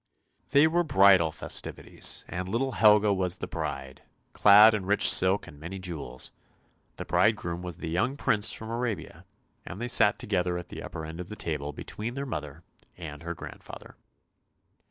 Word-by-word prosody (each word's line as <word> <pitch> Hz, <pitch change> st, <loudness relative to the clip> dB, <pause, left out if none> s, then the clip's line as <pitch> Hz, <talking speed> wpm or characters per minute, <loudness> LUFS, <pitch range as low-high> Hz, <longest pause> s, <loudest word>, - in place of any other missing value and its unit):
They 140 Hz, +3 st, +5 dB
were 170 Hz, +2 st, +2 dB
bridal 95 Hz, -, +4 dB
festivities, 80 Hz, -, -2 dB
and 90 Hz, +1 st, -5 dB
little 130 Hz, +6 st, -1 dB
Helga 105 Hz, -2 st, +4 dB
was 95 Hz, -2 st, -1 dB
the -, -, -5 dB
bride, 65 Hz, 0 st, -6 dB, 0.3 s
clad 105 Hz, +2 st, +7 dB
in 100 Hz, -4 st, -3 dB
rich 105 Hz, +1 st, +5 dB
silk 95 Hz, +2 st, +4 dB
and 75 Hz, -, -14 dB
many 85 Hz, +5 st, -7 dB
jewels. 85 Hz, -8 st, -5 dB, 0.6 s
The -, -, -7 dB
bridegroom 85 Hz, 0 st, 0 dB
was 90 Hz, -3 st, -7 dB
the -, -, -6 dB
young 125 Hz, +11 st, -1 dB
prince 105 Hz, -6 st, +1 dB
from 110 Hz, 0 st, -7 dB
Arabia, 115 Hz, -8 st, -5 dB, 0.4 s
and 95 Hz, -, -9 dB
they 120 Hz, -, -3 dB
sat 110 Hz, -4 st, +4 dB
together 90 Hz, -3 st, -1 dB
at 90 Hz, -, -8 dB
the -, -, -8 dB
upper 80 Hz, -1 st, -7 dB
end 80 Hz, +2 st, -9 dB
of 90 Hz, 0 st, -7 dB
the 105 Hz, -, -7 dB
table 75 Hz, -6 st, -4 dB
between 110 Hz, -, -7 dB
her 140 Hz, 0 st, -4 dB
mother 75 Hz, -, -7 dB, 0.3 s
and 75 Hz, -4 st, -9 dB
her 85 Hz, +1 st, -6 dB
grandfather. -, -, -11 dB
95 Hz, 170 wpm, -27 LUFS, 85-110 Hz, 0.6 s, clad